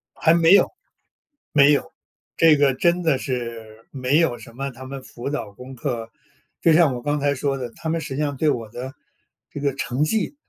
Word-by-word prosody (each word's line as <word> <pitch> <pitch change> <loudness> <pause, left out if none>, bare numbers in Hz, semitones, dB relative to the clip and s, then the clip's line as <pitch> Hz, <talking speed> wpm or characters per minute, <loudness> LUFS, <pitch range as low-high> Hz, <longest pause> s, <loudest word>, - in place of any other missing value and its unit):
还 160 - +3
没 170 +1 +5
有， 200 - +6 0.8
没 145 0 +6
有， 160 - -1 0.5
这 160 -2 +6
个 140 -2 +3
真 170 +6 +1
的 155 -5 +2
是， 115 -4 -6
没 135 +2 +1
有 160 -8 +1
什 115 - -14
么 135 +1 -4
他 130 +1 -11
们 135 +1 -7
辅 120 +2 -7
导 145 -8 -4
功 125 +6 -11
课。 115 -3 -4 0.5
就 165 - +5
像 155 -5 +5
我 120 - -6
刚 145 +3 -1
才 140 0 +1
说 135 0 -1
的， 125 -2 -5
他 160 - -5
们 165 0 -1
实 145 -3 -6
际 145 - -2
上 145 -2 -1
对 155 +1 +2
我 115 -5 -2
的 130 +4 -7 0.6
这 - - -6
个 140 -2 0
成 135 +1 -1
绩 220 - -1
140 Hz, 225 characters per minute, -22 LUFS, 125-155 Hz, 0.8 s, 有